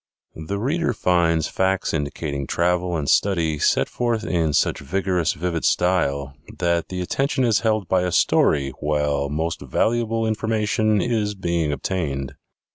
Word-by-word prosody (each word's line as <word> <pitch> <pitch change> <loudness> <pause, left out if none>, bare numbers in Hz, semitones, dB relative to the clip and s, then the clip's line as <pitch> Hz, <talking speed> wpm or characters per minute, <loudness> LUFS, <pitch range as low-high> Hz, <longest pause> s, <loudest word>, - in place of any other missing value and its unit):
The 100 - -2
reader 140 +6 0
finds 85 -5 +2
facts 95 0 0
indicating 70 -2 -3
travel 90 0 0
and 75 -3 -3
study 80 -6 +2
set - - +2
forth 120 -2 -1
in 85 -3 0
such - - +1
vigorous, 90 +1 0
vivid 85 0 -3
style 70 -7 +1 0.2
that 85 -1 0
the 90 -1 -4
attention 135 +8 0
is 115 -4 +3
held 110 -4 0
by 95 +1 +2
a 90 0 -1
story 70 -4 +2
while 75 -1 0
most 80 +3 -2
valuable 115 -1 0
information 110 -1 +1
is 110 -4 -1
being 85 -5 -1
obtained. 70 -3 -3
90 Hz, 140 wpm, -22 LUFS, 75-105 Hz, 0.2 s, is